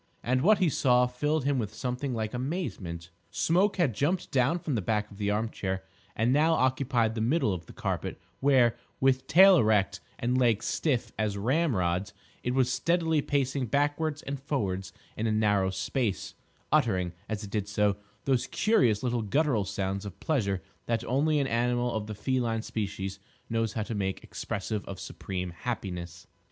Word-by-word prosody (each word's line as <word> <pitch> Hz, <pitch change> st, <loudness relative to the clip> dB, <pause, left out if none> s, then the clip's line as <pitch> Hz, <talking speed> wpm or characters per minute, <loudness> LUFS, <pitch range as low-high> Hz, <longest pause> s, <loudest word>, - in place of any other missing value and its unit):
And 130 Hz, +1 st, +1 dB
what 210 Hz, +7 st, +5 dB
he 185 Hz, -1 st, +3 dB
saw 125 Hz, -4 st, +4 dB
filled 145 Hz, +4 st, -1 dB
him 140 Hz, -2 st, +2 dB
with 105 Hz, -2 st, -4 dB
something 125 Hz, +2 st, -2 dB
like 110 Hz, 0 st, -3 dB
amazement. 115 Hz, -, -4 dB, 0.2 s
Smoke 185 Hz, -, +2 dB
had 160 Hz, -10 st, +2 dB
jumped 155 Hz, -, 0 dB
down 130 Hz, +6 st, +3 dB
from 160 Hz, -4 st, -3 dB
the 115 Hz, -, 0 dB
back 105 Hz, +2 st, -1 dB
of 100 Hz, -, -13 dB
the 100 Hz, -1 st, 0 dB
arm 105 Hz, +2 st, +1 dB
chair 95 Hz, -1 st, -3 dB, 0.3 s
and 115 Hz, +3 st, +2 dB
now 155 Hz, +3 st, +4 dB
occupied 130 Hz, -5 st, +2 dB
the 110 Hz, -, -3 dB
middle 120 Hz, -, +2 dB
of 85 Hz, -3 st, -6 dB
the -, -, -10 dB
carpet, -, -, -3 dB, 0.2 s
where, 130 Hz, -4 st, +4 dB, 0.2 s
with 130 Hz, 0 st, +2 dB
tail 190 Hz, +3 st, +8 dB
erect 105 Hz, -6 st, +2 dB, 0.2 s
and 125 Hz, +1 st, +1 dB
legs 115 Hz, -4 st, +2 dB
stiff 125 Hz, -8 st, 0 dB
as 105 Hz, -2 st, 0 dB
ramrods, 100 Hz, -, 0 dB, 0.3 s
it 125 Hz, +1 st, -1 dB
was 130 Hz, -2 st, +2 dB
steadily 165 Hz, -1 st, +2 dB
pacing 135 Hz, -2 st, 0 dB
backwards 145 Hz, +4 st, 0 dB
and 140 Hz, 0 st, -4 dB
forwards 95 Hz, -9 st, -2 dB, 0.2 s
in 110 Hz, -, -1 dB
a -, -, +1 dB
narrow 105 Hz, -3 st, +2 dB
space, 100 Hz, +2 st, -2 dB, 0.4 s
uttering, 105 Hz, -, +2 dB, 0.2 s
as 110 Hz, -1 st, -3 dB
it 100 Hz, -, -8 dB
did 105 Hz, -2 st, -1 dB
so, 105 Hz, -1 st, +1 dB, 0.3 s
those 130 Hz, -3 st, +1 dB
curious 130 Hz, -, +2 dB
little 120 Hz, -2 st, 0 dB
guttural 115 Hz, 0 st, +1 dB
sounds 95 Hz, 0 st, -2 dB
of 100 Hz, -3 st, -8 dB
pleasure 100 Hz, -, 0 dB, 0.2 s
that 115 Hz, -1 st, 0 dB
only 150 Hz, +5 st, +2 dB
an 140 Hz, -, +1 dB
animal 120 Hz, 0 st, +1 dB
of 110 Hz, -1 st, -3 dB
the 105 Hz, -, -5 dB
feline 120 Hz, -2 st, -1 dB
species 95 Hz, -3 st, -4 dB, 0.3 s
knows 115 Hz, -2 st, 0 dB
how 110 Hz, -, -1 dB
to 115 Hz, -, -5 dB
make 95 Hz, -2 st, -2 dB
expressive 105 Hz, +1 st, -4 dB
of 95 Hz, -, -7 dB
supreme 90 Hz, -2 st, -5 dB
happiness. 90 Hz, -5 st, -5 dB
120 Hz, 175 wpm, -29 LUFS, 100-140 Hz, 0.4 s, tail